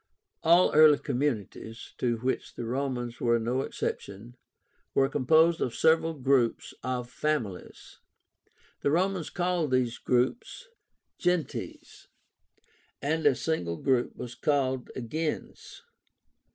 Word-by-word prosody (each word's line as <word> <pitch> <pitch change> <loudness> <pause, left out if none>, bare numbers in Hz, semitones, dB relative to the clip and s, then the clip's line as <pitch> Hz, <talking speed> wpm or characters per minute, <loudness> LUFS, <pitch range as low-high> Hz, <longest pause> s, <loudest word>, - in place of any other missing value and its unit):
All 170 +3 +5
early 155 -1 +7
communities, 115 -4 -3
to 120 -2 0
which 125 +3 -3
the 120 - -5
Romans 125 -1 -3
were 120 -1 +3
no 120 +3 -1
exception, 110 -1 -5 0.6
were 135 - +4
composed 160 +5 +3
of 120 - -1
several 160 0 +3
groups 130 -4 +1
of 125 -1 -3
FAMILIES. 125 -8 -4 0.8
The - - +1
Romans 180 +2 0
called 175 -3 -1
these 125 -2 0
groups 130 - -1 0.5
GENTES, 180 -5 -3 0.9
and 160 +3 +1
a - - +4
single 90 - -2
group 130 +2 0
was 120 -1 -7
called 130 -1 0
a - - -4
GENS. 155 - -5
130 Hz, 110 wpm, -28 LUFS, 120-160 Hz, 0.9 s, early